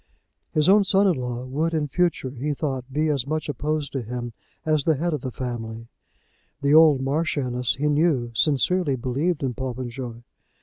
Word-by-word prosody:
His 155 -1 +2
own 200 +2 +6
son 195 +1 +3
in 190 - +4
law 125 -3 -4
would 155 +6 -1
in 150 -2 0
future, 160 -3 0
he 140 +3 -3
thought, 135 -3 -3
be 155 +3 +1
as 140 -3 0
much 155 +1 -2
opposed 150 +1 -2
to 135 - -1
him 120 +1 -5 0.3
as 155 -2 +2
the 160 +1 +3
head 170 +4 -1
of 150 - -2
the 130 - -3
family. 115 -2 -6 0.7
The 140 +1 +3
old 155 -4 +7
Marchioness, 135 -4 0
he 145 +3 -1
knew, 145 -5 +2
sincerely 150 +5 +2
believed 140 +7 -1
in 130 -2 -1
Popenjoy. 125 -2 -5
140 Hz, 175 wpm, -24 LUFS, 125-155 Hz, 0.7 s, old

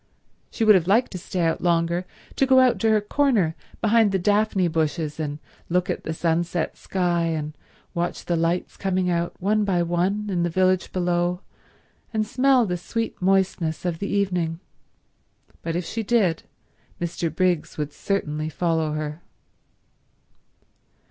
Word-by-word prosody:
She 225 - -1
would 215 - +8
have 180 -4 +3
liked 225 +6 +3
to 185 - -5
stay 180 +1 -3
out 165 -1 +1
longer, 170 +1 +1 0.3
to 270 - +2
go 260 -1 +6
to 225 - 0
her 215 -1 +4
corner 210 - +1 0.3
behind 220 -1 +4
the 195 - +2
daphne 205 -1 +2
bushes 160 -1 -1
and 145 -2 -3 0.3
look 180 +1 +1
at - - -5
the - - -2
sunset 170 +1 -1
sky 175 -2 0
and 155 -2 -3 0.4
watch 175 0 -3
the 175 - 0
lights 165 +2 -1
coming 185 -2 0
out 170 0 -2
one 210 +3 +2
by 185 -4 +1
one 185 +5 0
in 175 -2 0
the 175 - +1
village 185 +1 +1
below 175 0 0 0.7
and 215 -1 0
smell 255 +1 +3
the 180 -3 -2
sweet 225 +5 -4
moistness 185 -3 +1
of 170 -2 -1
the 200 - -3
evening, 180 -5 0 1.0
but 165 0 -3
if 175 0 -2
she 225 - -3
did 200 -7 +2 0.6
Mr. 170 -1 -2
Briggs 175 0 0
would 150 -1 -3
certainly 155 -6 -2
follow 160 -1 0
her. 155 +1 -4
180 Hz, 155 wpm, -24 LUFS, 165-200 Hz, 1.0 s, would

